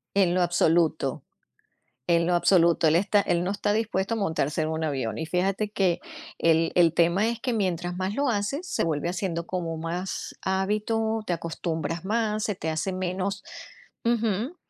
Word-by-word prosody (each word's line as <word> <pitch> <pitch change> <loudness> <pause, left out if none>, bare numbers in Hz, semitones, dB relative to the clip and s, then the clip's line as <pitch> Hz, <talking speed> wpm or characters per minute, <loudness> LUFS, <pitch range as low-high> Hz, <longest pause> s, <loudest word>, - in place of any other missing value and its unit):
En 185 -3 +3
lo 185 - +3
absoluto, 165 -5 +1 0.8
en 170 -1 +3
lo 175 - +2
absoluto, 170 -1 +4
él 160 - +4
está 200 +3 +3
él 175 -3 0
no 185 - -1
está 205 +1 0
dispuesto 220 -1 0
a - - -2
montarse 160 -6 0
en 155 - -1
un 160 0 -2
avión. 130 -8 -2
Y 160 - -3
fíjate 195 +5 0
que 185 -4 +1 0.4
el 165 0 +3
el 170 -2 +4
tema 175 +6 +3
es 235 -1 -3
que 250 0 -1
mientras 180 -5 -1
más 190 +2 -2
lo 280 +2 +1
haces, 235 - -2
se - - -1
vuelve 160 0 -1
haciendo 175 -2 -3
como 170 -3 -3
más 170 +3 -4
hábito, 215 +3 0
te 175 - +1
acostumbras 165 0 -3
más, 215 -1 0
se 210 - -1
te 160 -3 -3
hace 160 +4 -2
menos 185 +2 -2 0.6
ujú, 230 - 0
180 Hz, 175 wpm, -26 LUFS, 165-205 Hz, 0.8 s, absoluto